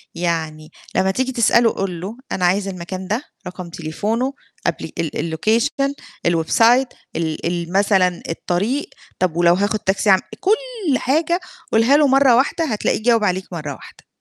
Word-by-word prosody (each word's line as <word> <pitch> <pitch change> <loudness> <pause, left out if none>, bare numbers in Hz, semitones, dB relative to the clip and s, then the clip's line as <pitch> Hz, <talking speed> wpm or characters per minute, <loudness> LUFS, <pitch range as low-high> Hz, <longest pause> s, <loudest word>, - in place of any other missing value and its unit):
يعني 160 -2 -3 0.2
لمّا 190 0 +2
تيجي 260 +5 -1
تسأله 235 -1 +4
قُل 180 -4 -3
له، 210 +6 -6
أنا 180 - 0
عايز 195 +2 +2
المكان 185 0 -6
ده، 225 +8 -1 0.2
رقم 180 -1 -7
تليفونه 210 - -2 0.3
قبل - - -2
ال 165 -3 -2
ال 160 +1 -3
الLocation، 275 - +1 0.3
الWeb 165 -2 +1
site، 245 +3 +5 0.3
ال 160 -1 -2
ال 170 0 -2
مثلًا 190 -3 +2
الطريق، 200 - -1 0.3
طُب 180 -3 +1
ولو 175 0 +5
هاخُد 205 +3 0
تاكسي 200 +1 0
أعم 190 - +6 0.2
كل 435 - 0
حاجة 320 +6 +1 0.3
قُلها 235 +6 +5
له 295 -2 +4
مرّة 270 -2 +5
واحدة، 285 +6 +1
هتلاقيه 215 -3 -1
جاوب 230 -2 +3
عليك 185 -1 0
مرّة 150 -4 -4
واحدة. - - -15
200 Hz, 160 wpm, -20 LUFS, 175-255 Hz, 0.3 s, أعم